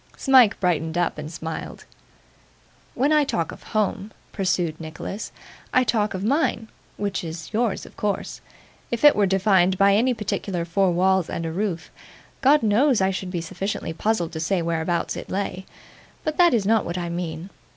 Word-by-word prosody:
Smike 260 -6 +5
brightened 165 -2 0
up 175 -3 0
and 150 +1 -6
smiled. 160 -1 -6 1.1
'When 280 +5 +2
I 300 -1 +5
talk 170 - -2
of - - -11
home,' 210 -1 -2 0.2
pursued 180 -4 -1
Nicholas, 165 +6 -6 0.4
'I 255 - +6
talk 215 -4 0
of 185 - -4
mine 230 -2 0 0.3
which 200 -3 -2
is 165 +3 -7
yours 225 -1 0
of - - -15
course. 205 -1 -3 0.5
If 235 +2 -3
it 295 - +8
were 205 -1 +3
defined 190 -1 +3
by 200 +1 +5
any 245 +4 +2
particular 195 -4 -3
four 190 +3 +2
walls 185 0 +2
and 165 - -3
a 165 - -3
roof, 175 -2 -3 0.5
God 280 +1 +5
knows 235 +4 +3
I 190 0 +2
should 190 -1 -4
be 175 -2 -3
sufficiently 190 0 -4
puzzled 175 -2 -1
to 160 - -5
say 170 +2 0
whereabouts 165 +1 -1
it - - -7
lay; 190 -1 -3 0.6
but 310 -1 -2
that 345 -7 +5
is 210 -4 0
not 220 0 +3
what 170 +1 -4
I 175 -1 -3
mean. 170 +1 -5
190 Hz, 175 wpm, -23 LUFS, 170-220 Hz, 1.1 s, it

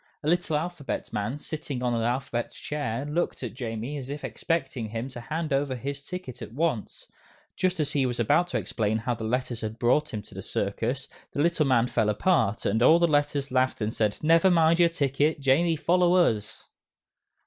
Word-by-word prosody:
A - - -3
little 170 -2 +2
Alphabet 165 -2 -4
Man 105 +6 -2
sitting 145 -4 -5
on 120 -1 +1
an 115 - 0
Alphabet 120 0 -1
Chair 140 -4 -3
looked 150 -1 -2
at 125 - -4
Jamie 120 +2 -4
as 130 -1 -8
if 145 +1 -5
expecting 135 -9 -2
him 115 +4 -4
to 125 -2 -8
hand 155 +4 -3
over 135 -1 0
his 140 +3 -5
ticket 180 -6 -7
at - - -7
once. 150 -6 -2 0.5
Just 185 -1 0
as 145 -2 0
he 135 -4 +2
was 120 -1 -3
about 145 +10 +3
to 180 - -1
explain 110 -1 -1
how 115 +2 -1
the 110 - -6
Letters 120 0 -1
had 110 0 -4
brought 130 +6 +2
him 105 -1 -4
to - - -13
the 95 - -6
circus, 115 +8 -2 0.3
the 145 - 0
little 165 -3 +2
man 120 -3 +4
fell 110 -3 +1
apart, 110 - +1
and 110 +3 +1
all 160 +7 +7
the 170 0 +3
Letters 145 -2 +1
laughed 130 0 +1
and 110 0 -2
said, 105 -2 0
"Never 165 +4 +5
mind 165 -1 +4
your 170 -1 +6
ticket, 145 -1 +1
Jamie 150 +5 +3
follow 175 +3 +3
us!" 110 - +1
135 Hz, 200 wpm, -27 LUFS, 115-160 Hz, 0.5 s, all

